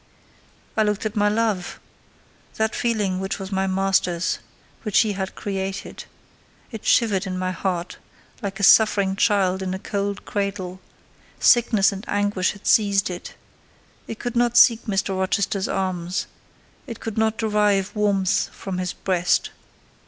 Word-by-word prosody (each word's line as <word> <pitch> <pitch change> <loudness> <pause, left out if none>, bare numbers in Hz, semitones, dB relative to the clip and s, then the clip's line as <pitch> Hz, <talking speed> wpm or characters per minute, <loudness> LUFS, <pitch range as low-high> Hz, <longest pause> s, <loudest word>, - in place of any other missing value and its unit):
I 220 - +2
looked 210 0 0
at 215 +1 -3
my 210 -1 +3
love: 210 -4 -1 0.8
that 220 0 0
feeling 210 -6 0
which 190 0 -3
was 195 0 -7
my 190 0 0
master's—which 190 +2 -1
he 220 - 0
had 190 0 -4
created; 195 -1 -5 0.7
it 225 -3 -7
shivered 205 -4 +3
in 185 -1 -3
my 185 0 -1
heart, 180 -1 -3 0.4
like 200 -1 -5
a - - -3
suffering 200 -2 +5
child 195 -2 +2
in 190 0 -2
a - - -3
cold 200 0 -3
cradle; 195 -2 -3 0.6
sickness 225 -5 +4
and 195 0 -7
anguish 205 -2 0
had 205 - -16
seized 200 -3 +3
it; 175 - -8 0.7
it 225 - -6
could 245 +1 -5
not 240 0 +2
seek 235 -2 +6
Mr. 195 -2 -1
Rochester's 190 +1 0
arms—it 185 +6 -5
could 225 -1 -4
not 220 0 +1
derive 210 -3 +1
warmth 200 -3 +1
from 190 -2 -5
his 180 0 -2
breast. 180 -2 0
200 Hz, 140 wpm, -23 LUFS, 190-210 Hz, 0.8 s, seek